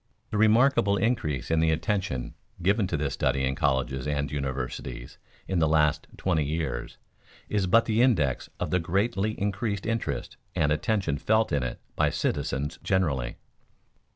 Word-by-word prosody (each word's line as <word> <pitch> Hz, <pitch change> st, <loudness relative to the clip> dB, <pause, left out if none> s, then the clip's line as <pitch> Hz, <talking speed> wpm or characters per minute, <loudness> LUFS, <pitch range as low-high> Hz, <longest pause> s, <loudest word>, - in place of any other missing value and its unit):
The 105 Hz, -, -1 dB
remarkable 110 Hz, -2 st, +4 dB
increase 80 Hz, -, -1 dB
in 80 Hz, -, +3 dB
the 80 Hz, 0 st, +3 dB
attention 80 Hz, -5 st, -1 dB, 0.3 s
given 100 Hz, +3 st, +2 dB
to 85 Hz, -, -1 dB
this 70 Hz, -2 st, -1 dB
study 65 Hz, +1 st, 0 dB
in 65 Hz, 0 st, +1 dB
colleges 65 Hz, -3 st, 0 dB
and 70 Hz, -2 st, -1 dB
universities 65 Hz, -3 st, -4 dB, 0.3 s
in 95 Hz, -2 st, 0 dB
the 80 Hz, -, +3 dB
last 75 Hz, 0 st, +2 dB
twenty 85 Hz, -5 st, +1 dB
years 70 Hz, -5 st, -3 dB, 0.5 s
is 100 Hz, -3 st, +1 dB
but 115 Hz, +5 st, +5 dB
the 110 Hz, +1 st, +2 dB
index 80 Hz, -, +2 dB
of -, -, -2 dB
the 90 Hz, -, +3 dB
greatly 100 Hz, +5 st, 0 dB
increased 100 Hz, 0 st, -2 dB
interest 115 Hz, +1 st, -2 dB, 0.2 s
and 80 Hz, -4 st, +2 dB
attention 75 Hz, -2 st, 0 dB
felt 110 Hz, 0 st, +2 dB
in 70 Hz, -, +1 dB
it 65 Hz, -, -4 dB, 0.2 s
by -, -, +3 dB
citizens 70 Hz, 0 st, -2 dB
generally. 75 Hz, -11 st, 0 dB
80 Hz, 155 wpm, -27 LUFS, 70-100 Hz, 0.5 s, but